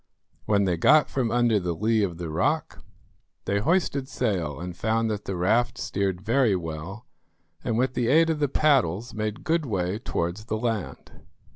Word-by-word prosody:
When 100 -1 +2
they 90 -3 0
got 150 - +4
from 125 -4 0
under 120 -2 +2
the 90 -2 -2
lee 110 +4 +1
of 90 -5 -1
the 85 -2 -5
rock, 80 - -1 0.6
they 100 - 0
hoisted 140 - 0
sail 90 - -2
and 90 0 -6
found 110 +3 0
that 105 -1 -4
the 95 - -3
raft 115 +7 +1
steered 95 -2 -2
very 115 0 +2
well, 85 +6 -6 0.6
and 115 -2 -1
with 130 +1 +1
the 120 -2 0
aid 165 +5 +4
of 155 - -2
the 145 -2 +1
paddles 125 - +1
made 110 0 -4
good 165 -1 +1
way 95 -5 -2
towards 90 -2 -3
the 110 - -2
land. 110 -3 -3
110 Hz, 175 wpm, -25 LUFS, 90-125 Hz, 0.6 s, got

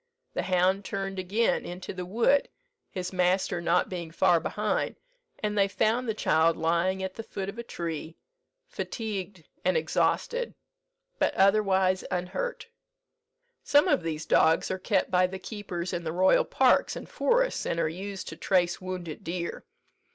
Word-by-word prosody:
The - - -1
hound 185 +2 +2
turned 195 0 -4
again 205 +5 +1
into 180 +1 -6
the 180 -1 -6
wood, 240 +8 +2 0.4
his 185 0 -5
master 180 -1 +1
not 170 +1 +2
being 175 -3 -5
far 170 +1 +3
behind, 210 +5 -1 0.5
and 210 0 0
they 200 -1 +4
found 220 +5 +1
the 220 - 0
child 165 -4 +3
lying 170 +4 +1
at 190 0 -3
the 225 - -6
foot 195 -3 -5
of 210 - -8
a - - -4
tree, 165 -6 -5 0.5
fatigued 200 -6 -5 0.2
and 185 -2 +2
exhausted, 475 - 0 0.6
but - - +1
otherwise 190 -2 +3
unhurt. 185 - -3 1.0
Some 290 +1 +4
of - - +3
these 160 -2 -4
dogs 160 +1 +3
are 190 - -2
kept 195 -1 0
by 185 0 +4
the 190 +1 -6
keepers 190 -4 -5
in 175 - -2
the 160 - -2
royal 185 +2 +4
parks - - +3
and - - -7
forests, - - +1
and 170 - -1
are - - +2
used 190 +4 -6
to - - -7
trace 175 -2 +1
wounded 180 -4 -6
deer. 170 +1 -4
185 Hz, 160 wpm, -28 LUFS, 175-200 Hz, 1.0 s, they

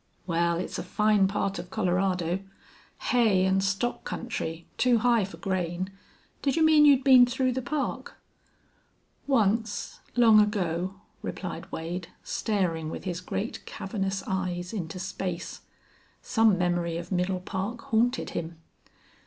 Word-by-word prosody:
"Wal, 170 -1 +1
it's 180 - -4
a - - -3
fine 210 +1 +3
part 195 -1 -1
of 175 0 -8
Colorado. 185 -3 0 0.7
Hay 215 -7 +4
an' 190 0 +2
stock 200 +5 -1
country 170 -8 -4
too 250 -2 +4
high 235 -1 +3
fer 190 - -7
grain. 185 0 -2 0.5
Did 275 - +1
you 320 -1 +4
mean 310 -1 +6
you'd 275 -2 +6
been 255 -3 +8
through 255 +1 0
the 260 +1 -2
Park?" 285 +3 -3 1.1
"Once 225 -4 +1 0.2
long 225 -3 +7
ago," 190 -3 -1 0.3
replied - - -6
Wade, 165 +2 -4 0.2
staring 175 -7 -1
with - - -6
his 180 -1 -3
great, 205 +4 -4
cavernous 195 -1 -3
eyes 180 -1 -2
into 175 -4 -4
space. 180 -2 -4 0.6
Some 225 -4 +3
memory 175 -1 0
of 170 +2 -7
Middle 185 0 0
Park 195 +6 -4
haunted 240 +3 +1
him. 165 0 -5
195 Hz, 135 wpm, -27 LUFS, 180-225 Hz, 1.1 s, been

